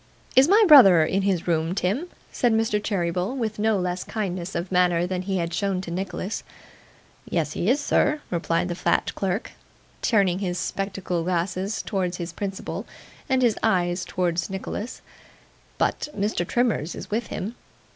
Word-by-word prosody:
'Is 265 +2 +7
my 415 +5 +6
brother 195 - +9
in 195 +5 0
his 190 -4 0
room, 165 +1 +1
Tim?' 205 - -1 0.2
said 240 -2 +2
Mr. 220 -2 +1
Cheeryble, 185 +3 -1
with 220 -4 -3
no 220 0 +2
less 180 -1 -2
kindness 185 -4 -4
of 175 +2 -3
manner 175 -1 +3
than 180 0 -2
he 190 0 -2
had 170 -1 -2
shown 195 -2 0
to 175 - -7
Nicholas. 185 +3 -4 0.9
'Yes, 160 -3 0
he 185 - 0
is, 270 +4 +3
sir,' 300 +1 +2
replied 170 0 0
the - - -1
fat 175 - 0
clerk, 195 +2 -2 0.5
turning 195 -5 +2
his 180 -3 -2
spectacle 185 -2 -2
glasses 185 +4 -1
towards 185 -3 -2
his 170 -1 -5
principal, 195 +1 -5 0.4
and 260 -1 +2
his 235 -3 +2
eyes 180 -4 +1
towards 175 -1 -1
Nicholas, 195 +4 -5 0.7
'but - - 0
Mr. 200 -3 -1
Trimmers 225 - 0
is - - -9
with 225 +1 -1
him. 210 +5 -4
190 Hz, 160 wpm, -24 LUFS, 175-215 Hz, 0.9 s, brother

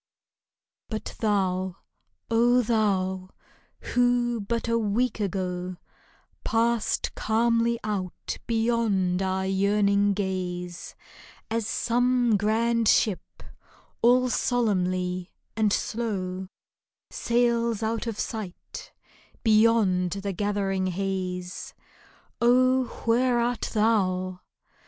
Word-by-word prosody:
But 215 -2 -5
thou, 190 -4 0 0.6
O 240 +2 +4
thou, 190 -4 0 0.6
who 245 -1 +2
but 230 +4 -2
a 230 0 +2
week 225 +3 0
ago 185 -2 -3 0.7
Passed 230 0 0
calmly 230 +1 +1
out 195 -4 -4
beyond 225 -6 +1
our 190 0 -1
yearning 200 +1 +2
gaze, 180 -3 -4 0.6
As 225 -2 -1
some 245 -1 +2
grand 225 +2 +1
ship, 205 -3 +1 0.6
all 250 +2 +5
solemnly 185 -7 0 0.3
and 215 -1 +2
slow, 190 -5 -2 0.6
Sails 235 -2 +1
out 225 +1 -2
of 225 -2 -4
sight 210 -6 -6 0.5
beyond 215 -5 +3
the 200 0 -4
gathering 195 -1 -1
haze 185 -1 -4 0.3
— - - -32
Oh, 255 +2 +4 0.2
where 240 +2 +3
art 240 0 -1
thou 185 -4 +1
210 Hz, 90 wpm, -26 LUFS, 185-235 Hz, 0.7 s, all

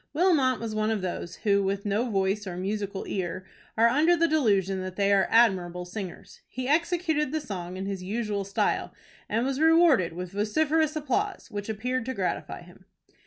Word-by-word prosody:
Wilmot 300 -7 +3
was 230 -1 -4
one 215 0 0
of 215 -4 -1
those, 175 -1 -4
who, 200 -1 +4
with 195 +1 -2
no 210 +5 0
voice 195 0 0
or 175 -1 -5
musical 200 +1 -3
ear, 185 -1 -3 0.3
are 230 +1 +6
under 310 +8 +3
the 335 +1 +3
delusion 200 - +1
that 185 0 -6
they 200 0 +2
are 195 -1 +3
admirable 180 -6 +3
singers. 180 -1 -8
He 255 0 -5
executed 320 -1 +1
the 315 - -1
song 185 - -6
in 190 - -4
his 195 -2 -4
usual 205 +1 -2
style, 195 0 -1 0.3
and 225 +3 0
was 270 0 -1
rewarded 320 - +4
with 180 +1 -6
vociferous 305 +10 +1
applause, 345 - -2
which 205 0 -5
appeared 250 +3 -2
to 260 - -3
gratify - - -3
him. - - -18
215 Hz, 180 wpm, -27 LUFS, 195-280 Hz, 0.3 s, are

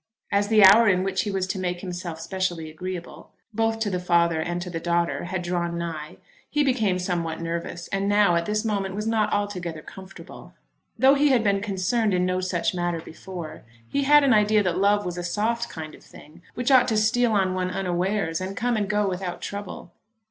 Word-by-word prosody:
As 200 0 +2
the 215 -1 +5
hour 220 +4 +8
in 185 -1 +2
which 190 0 0
he 210 - -3
was 190 -2 -1
to 190 +1 -4
make 180 -1 -3
himself 175 -3 -6
specially 175 -2 -3
agreeable, 180 +2 -7 0.2
both 225 +1 0
to 210 -2 0
the 180 - -1
father 170 -2 +2
and 175 +2 -3
to 180 - -7
the 165 - -3
daughter, 170 +1 -1
had 180 0 -3
drawn 170 -1 -2
nigh, 160 -3 -5 0.3
he 295 -1 +1
became 225 -9 +1
somewhat 175 -3 -2
nervous, 170 0 -5
and 195 0 -1
now, 205 -3 +4
at 170 0 0
this 210 +1 -1
moment, 195 -3 -2
was 210 +1 -3
not 225 -1 +1
altogether 180 -6 -3
comfortable. 190 0 -12 0.4
Though 265 +4 +6
he 285 +1 +3
had 250 -4 +3
been 200 -2 +1
concerned 205 +1 0
in 180 0 +1
no 185 0 0
such 180 -1 -1
matter 175 -1 -2
before, 165 0 -9 0.3
he 280 - -1
had 295 +1 +6
an 270 -3 +4
idea 210 0 +4
that 180 -1 -1
love 205 0 +2
was 180 0 -4
a - - -4
soft 220 +6 -1
kind 155 -1 -8
of - - -15
thing 160 +4 -16
which 250 +3 0
ought 260 -2 +6
to 220 - +1
steal 225 +2 +2
on 190 -2 +2
one 185 0 -1
unawares 185 -1 -1
and 190 +1 -5
come 245 0 0
and 205 -3 -1
go 210 -1 +1
without 180 -1 -4
trouble. 200 -3 -7
190 Hz, 210 wpm, -24 LUFS, 175-210 Hz, 0.4 s, hour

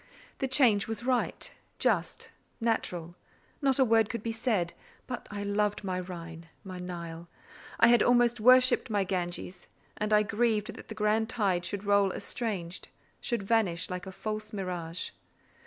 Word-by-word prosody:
The 270 - 0
change 250 -7 +4
was 225 0 -3
right, 250 -1 -1 0.3
just, - - 0 0.3
natural; 180 -7 -1 0.5
not 270 -2 +2
a 265 - +5
word 225 -2 +4
could 235 -3 -4
be 230 - -1
said: 220 -7 0 0.3
but 250 - -6
I 205 -1 -4
loved 205 +1 0
my 185 -2 -2
Rhine, 170 -2 -8
my 185 -2 -7
Nile; 170 -2 -6 0.5
I 230 - +7
had 240 0 +6
almost 240 -1 +4
worshipped 255 +3 +5
my 205 -2 +1
Ganges, 180 -1 -4 0.3
and 215 0 -2
I 210 0 +5
grieved 215 0 0
that - - -11
the - - -7
grand 220 +1 +1
tide 195 -7 0
should 200 +2 -4
roll 200 -1 +3
estranged, 190 -8 -4 0.3
should 235 -5 -2
vanish 195 -5 +1
like 180 +1 -5
a - - -6
false 215 +2 -5
mirage. 180 -4 -4
210 Hz, 155 wpm, -29 LUFS, 180-230 Hz, 0.5 s, I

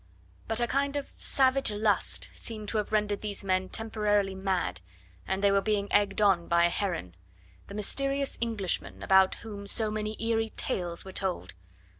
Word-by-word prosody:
But 225 +1 +1
a 240 - +3
kind 280 +3 0
of 285 - -4
savage 270 -2 +2
lust 210 -1 0
seemed 215 -2 -6
to 220 - 0
have 210 - -3
rendered 210 -1 +1
these 205 -1 -4
men 185 -1 0
temporarily 210 -3 0
mad, 190 - -1 0.5
and 190 +1 -1
they 200 - +5
were 200 0 +3
being 205 -1 0
egged 205 0 +3
on 190 -4 +3
by 170 0 +4
Heron. 170 - -2 0.5
The 200 - -8
mysterious 275 +6 +1
Englishman, 220 -6 -2
about 190 0 +5
whom 200 -2 -7
so 215 +1 +2
many 215 0 -3
eerie 225 -1 0
tales 175 -1 -2
were 190 - -8
told! 190 - -1
205 Hz, 165 wpm, -29 LUFS, 195-225 Hz, 0.5 s, they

